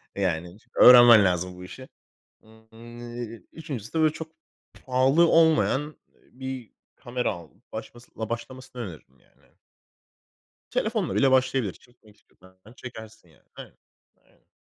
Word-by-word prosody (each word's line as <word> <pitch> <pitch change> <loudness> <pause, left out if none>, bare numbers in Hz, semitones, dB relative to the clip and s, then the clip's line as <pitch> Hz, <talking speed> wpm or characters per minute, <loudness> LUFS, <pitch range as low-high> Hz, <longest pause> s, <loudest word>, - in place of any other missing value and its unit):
E, 100 - -4
yani 90 0 -2 0.2
öğrenmen 120 -3 +9
lazım 90 0 -1
bu 90 - -11
işi. 130 +8 -11 0.5
Hı, 110 0 -21
eee, 120 0 -9
3.'sü 140 -9 -8
de 160 - 0
böyle 155 -1 +3
çok 160 0 -8 0.5
pahalı 135 +6 +3
olmayan, 160 -4 +3
ııı, 150 +1 -10 0.4
bir 130 -2 -7 0.2
kamera 125 0 -3
alıp 90 +6 -15
başlamasın 120 +1 -10 0.2
başlamasını 130 +2 -7
öneririm 90 -8 -12
yani. - - -31 1.3
Telefonla - - -1
bile 135 +5 +3
başlayabilir 130 -5 +1
çekmek 110 0 -23
istiyorsan 95 -2 -24 0.2
çekersin 110 -6 -11
yani. 80 - -25 0.2
Evet, - - -11 0.5
aynen. - - -32
120 Hz, 125 wpm, -25 LUFS, 105-130 Hz, 1.3 s, öğrenmen